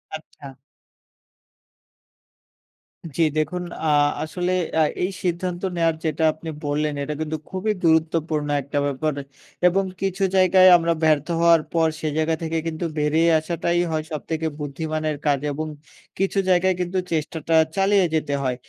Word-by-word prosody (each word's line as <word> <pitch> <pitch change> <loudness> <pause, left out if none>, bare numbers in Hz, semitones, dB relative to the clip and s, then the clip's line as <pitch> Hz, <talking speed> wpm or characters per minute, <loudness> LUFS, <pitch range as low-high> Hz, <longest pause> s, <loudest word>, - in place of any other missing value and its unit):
আচ্ছা। 150 -2 -11 2.7
জি - - +2 0.2
দেখুন 180 +4 -1 0.2
আ - - 0 0.4
আসলে 180 +3 -2 0.3
আ - - +5 0.2
এই 185 - +1
সিদ্ধান্ত 175 0 -2
নেওয়ার 165 -1 +2
যেটা 160 +1 -1
আপনি 160 +1 -9 0.2
বললেন, 150 +1 0
এটা 150 +2 -3
কিন্তু 155 0 -2
খুবই 195 +3 -1
গুরুত্বপূর্ণ 160 -2 +1
একটা 140 +2 -5
ব্যাপার 145 +2 -1 0.5
এবং 195 +2 +2 0.2
কিছু 195 0 -1
জায়গায় 185 0 +6
আমরা 170 0 +1
ব্যর্থ 155 -1 +3
হওয়ার 170 -2 +5
পর 165 -1 +3
সে 155 - -2
জায়গা 160 +1 +1
থেকে 165 0 -2
কিন্তু 165 +1 -3
বেরিয়ে 160 +3 +3
আসাটাই 170 +1 -1
হয় 155 -1 -1
সবথেকে 160 +1 -3
বুদ্ধিমানের 155 +1 -3
কাজ 145 -2 +2
এবং 155 +2 -4 0.5
কিছু 195 +1 +1
জায়গায় 185 +1 +3
কিন্তু 180 +1 -2
চেষ্টাটা 160 0 -1 0.2
চালিয়ে 195 -1 +3
যেতে 150 -2 -1
হয় 125 -1 0
160 Hz, 140 wpm, -23 LUFS, 155-175 Hz, 2.7 s, জায়গায়